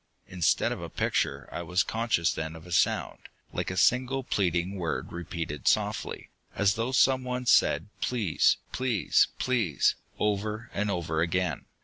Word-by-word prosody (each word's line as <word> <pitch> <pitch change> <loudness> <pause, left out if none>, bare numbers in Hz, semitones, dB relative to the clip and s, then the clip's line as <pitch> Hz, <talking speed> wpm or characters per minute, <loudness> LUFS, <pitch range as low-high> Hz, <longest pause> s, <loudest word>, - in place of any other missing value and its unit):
Instead 90 -3 +1
of - - -4
a - - -6
picture, - - -1
I - - -4
was 90 +3 +1
conscious 110 - 0
then 80 +1 -4
of 80 - -12
a 90 - -11
sound, 85 - +1 0.3
like - - -2
a 95 - -4
single 130 +6 +2
pleading 90 -5 0
word 85 -3 -3
repeated 80 -5 -5
softly, - - 0 0.3
as 100 0 +3
though 115 +4 -2
someone 130 -1 +2
said 115 - +4 0.2
"Please! 110 -10 +2
Please! 125 -6 +2
Please!" 110 - +1 0.2
over 105 +3 -2
and 105 +1 -1
over 80 -4 -1
again. 85 -2 -1
95 Hz, 145 wpm, -28 LUFS, 85-115 Hz, 0.3 s, said